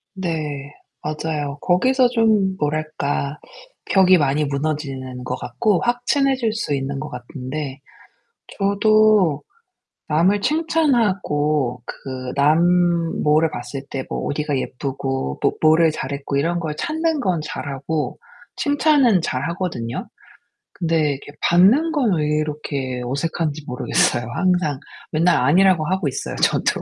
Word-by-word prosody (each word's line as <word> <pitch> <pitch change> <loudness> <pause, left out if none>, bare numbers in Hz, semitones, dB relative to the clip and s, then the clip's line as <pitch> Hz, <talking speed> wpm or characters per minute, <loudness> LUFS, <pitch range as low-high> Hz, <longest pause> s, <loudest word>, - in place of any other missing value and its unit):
네. 150 -6 -4 0.3
맞아요. 150 -2 -3
거기서 250 +8 +3
좀 220 -5 +2
뭐랄까? 150 -1 -2 0.5
벽이 185 -1 +5
많이 145 0 +1
무너지는 140 -3 -3
것 125 0 -3
같고 175 - 0
확 245 0 -1
친해질 265 -5 +2
수 220 -10 -2
있는 135 0 -3
것 150 - -5
같은데 130 +2 -6 0.8
저도 200 -5 +3 0.7
남을 180 +7 +3
칭찬하고 195 - +1
그 130 -1 -6
남 150 +4 +4 0.6
뭐를 155 +2 +3
봤을 135 +2 -6
때 135 -1 -4
뭐 - - -4
어디가 145 -1 -1
예쁘고 135 - -3
또 - - +3
뭐를 160 +1 +5
잘했고 140 -1 -4
이런 170 +5 0
걸 155 -2 -3
찾는 320 -1 -1
건 180 -8 0
잘하고 145 +1 -4 0.4
칭찬은 285 - +3
잘 130 -5 -2
하거든요. 170 - -4 0.7
근데 160 -3 +1
이렇게 140 +1 -7
받는 215 - +4
건 265 -10 +1
왜 150 -1 0
이렇게 140 -4 -3
어색한지 155 +3 -2
모르겠어요 120 -2 +1
항상. 180 -7 +1 0.3
맨날 165 +3 +3
아니라고 175 +2 +4
하고 185 -2 0
있어요, 135 - -4
저도. - - +1
155 Hz, 255 characters per minute, -21 LUFS, 140-190 Hz, 0.8 s, 벽이